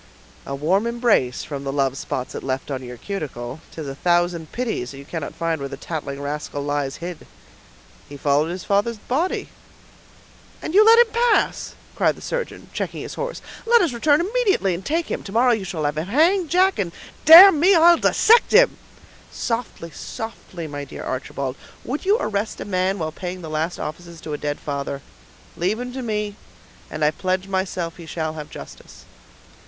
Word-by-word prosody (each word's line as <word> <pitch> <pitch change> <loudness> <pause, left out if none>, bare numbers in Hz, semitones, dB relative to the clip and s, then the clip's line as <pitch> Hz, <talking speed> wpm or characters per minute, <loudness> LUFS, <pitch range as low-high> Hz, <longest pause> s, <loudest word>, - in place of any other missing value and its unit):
"A 140 - -3
warm 185 +10 +1
embrace, 235 - +1
from 140 -2 -6
the 135 - -3
love 135 -1 0
spots 130 -2 -4
it - - -5
left 135 +2 -3
on 130 -1 -3
your 125 -1 -8
cuticle; 140 - -6
'tis 155 -3 -7
a 135 - -4
thousand 175 +1 0
pities 225 - -3
that 135 - -10
you 140 - -10
cannot 160 -1 -5
find 165 -2 -1
where 140 - -4
the 135 - -7
tattling 140 -3 -5
rascal 145 0 -4
lies 145 -1 -2
hid." 175 0 -8 0.8
"He 145 - -9
followed 145 +3 +2
his 180 +1 -5
father's 205 +3 +1
body." 290 - -2 1.1
"And 315 - -5
you 415 +3 +7
let 450 +1 +7
him 475 -2 +5
pass!" 475 +1 +1 0.2
cried - - +2
the - - -14
surgeon, - - -5
checking - - -4
his - - -7
horse. - - -5 0.2
"Let 470 -3 +6
us 320 -8 0
return 290 +6 +3
immediately, 390 - +1
and 175 +3 -5
take 325 - 0
him; - - -2
to 195 - -9
morrow 245 +4 +4
you 220 -4 0
shall 175 -4 -4
have 150 +1 0
him 160 - -4
hanged, 330 - +3
Jack,—and, 355 - +2 0.3
damn 330 0 +10
him, 365 0 +6
I'll 340 +1 +7
dissect 460 +7 +4
him!" - - +6 0.5
"Softly, 230 -8 -4
softly, 185 -1 -7
my 145 -2 -5
dear 140 - -8
Archibald. 130 0 -4 0.3
Would 285 +8 -4
you 405 +3 +4
arrest 205 - -2
a - - -5
man 190 0 0
while 160 -3 -3
paying 180 +2 -6
the 160 - -7
last 160 +3 -1
offices 170 +2 -7
to 155 - -6
a - - -2
dead 145 0 -3
father? 140 -1 -4 0.5
Leave 190 +6 -1
him 250 0 -5
to 260 - -4
me, 210 -3 -3 0.5
and 155 0 -1
I 150 - +4
pledge 185 +3 -2
myself 185 -3 -2
he 170 -2 -11
shall 160 -1 -3
have 150 -2 -8
justice." - - -12
180 Hz, 190 wpm, -22 LUFS, 150-250 Hz, 1.1 s, damn